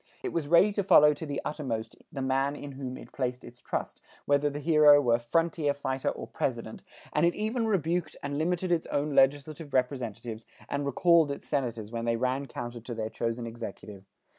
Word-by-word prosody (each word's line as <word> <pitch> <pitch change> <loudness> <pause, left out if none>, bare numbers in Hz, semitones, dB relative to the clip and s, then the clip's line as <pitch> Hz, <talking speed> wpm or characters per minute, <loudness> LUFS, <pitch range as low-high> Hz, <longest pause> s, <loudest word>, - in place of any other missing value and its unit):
It - - -3
was 165 -4 -1
ready 170 +6 +5
to 200 0 -1
follow 150 -5 +7
to 150 +2 -7
the 140 -1 -3
uttermost 130 -8 -3 0.2
the 135 - -4
man 135 +2 +1
in 145 -1 -7
whom 130 -1 -6
it - - -12
placed 125 -2 -3
its 120 +1 -13
trust, - - -4 0.2
whether 145 +1 +3
the 145 +1 -5
hero 150 -1 +6
were 120 -4 +3
frontier 150 +3 0
fighter 135 -2 -2
or - - -5
president, - - -3 0.3
and 150 - +2
it 170 0 +3
even 225 +2 -1
rebuked 175 -4 0
and 140 +1 -2
limited 180 +2 0
its 170 -2 +1
own 145 +1 -1
legislative 145 +2 +2
representatives 120 -3 -2 0.2
and 140 0 -2
recalled 165 +2 +4
its 140 - -6
senators 115 -7 -2
when 115 -1 -3
they 115 0 +1
ran 130 +3 -1
counter 120 -1 -6
to 120 +1 -7
their 110 -1 -3
chosen 115 0 -2
executive. 110 -3 -8
140 Hz, 190 wpm, -29 LUFS, 120-155 Hz, 0.3 s, follow